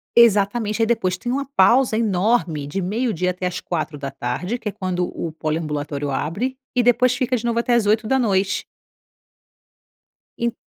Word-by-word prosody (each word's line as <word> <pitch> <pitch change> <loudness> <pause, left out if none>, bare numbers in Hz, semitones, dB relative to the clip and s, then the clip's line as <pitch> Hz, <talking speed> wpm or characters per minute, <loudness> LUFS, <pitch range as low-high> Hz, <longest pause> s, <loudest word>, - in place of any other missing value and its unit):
Exatamente. 215 0 +4
Aí - - +5
depois 185 -5 0
tem 240 +6 -4
uma 275 +1 -1
pausa 235 +4 +4
enorme 185 -8 +1
de 195 +7 -3
meio-dia 185 -2 0
até 180 0 -3
às 180 - -4
16h, 150 - -3
que 215 - -3
é - - -5
quando 185 -2 -2
o 165 - -5
poliambulatório 150 -2 -3
abre, 200 - -2 0.2
e 250 - +3
depois 250 +1 +4
fica 255 0 0
de 235 - -3
novo 235 0 +1
até 240 +1 +1
às 235 -3 +3
20h. 215 -3 +1 1.7
En 235 0 -1
200 Hz, 150 wpm, -21 LUFS, 170-235 Hz, 1.7 s, Aí